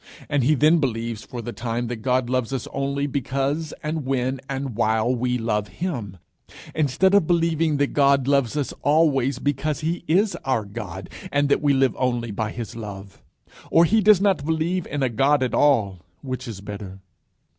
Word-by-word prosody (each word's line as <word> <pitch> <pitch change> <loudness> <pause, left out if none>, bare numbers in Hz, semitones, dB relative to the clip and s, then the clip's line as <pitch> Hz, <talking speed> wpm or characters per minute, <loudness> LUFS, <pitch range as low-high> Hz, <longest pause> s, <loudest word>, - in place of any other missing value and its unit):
And 145 -3 +1
he 150 +5 +4
then 155 +4 +4
believes 115 -5 -2
for 120 -3 -7
the 120 - -5
time 120 +1 -3
that 120 0 -4
God 125 +2 0
loves 125 -1 -1
us 130 - -3
only 140 +1 -1
because 140 +3 -2
and 155 0 -2
when 130 0 -1
and 135 -3 -4
while 110 +2 +1
we 125 +1 0
love 105 -3 -1
him; 120 - -5 0.6
instead 155 +6 +2
of 200 -6 +4
believing 165 -3 +2
that 145 0 0
God 140 -2 +3
loves 140 -1 +2
us 145 - -2
always 140 -4 +2
because 145 +2 -1
he 165 +3 -2
is 195 +4 +2
our 130 -8 -1
God, 100 -3 -7 0.2
and 145 0 +2
that 140 - +2
we 145 -2 +3
live 135 -1 +2
only 120 -3 -1
by 105 +1 -2
his 115 -1 -7
love. 100 -3 -9 0.5
Or 165 - +5
he 220 +6 +3
does 210 -2 +6
not 195 -7 +2
believe 160 +3 -1
in 145 -1 -2
a - - +3
God 135 +4 +2
at 125 - -2
all, 110 -11 +3 0.2
which 130 -1 -5
is 105 -4 -7
better. 100 -2 -8
135 Hz, 185 wpm, -23 LUFS, 115-150 Hz, 0.6 s, does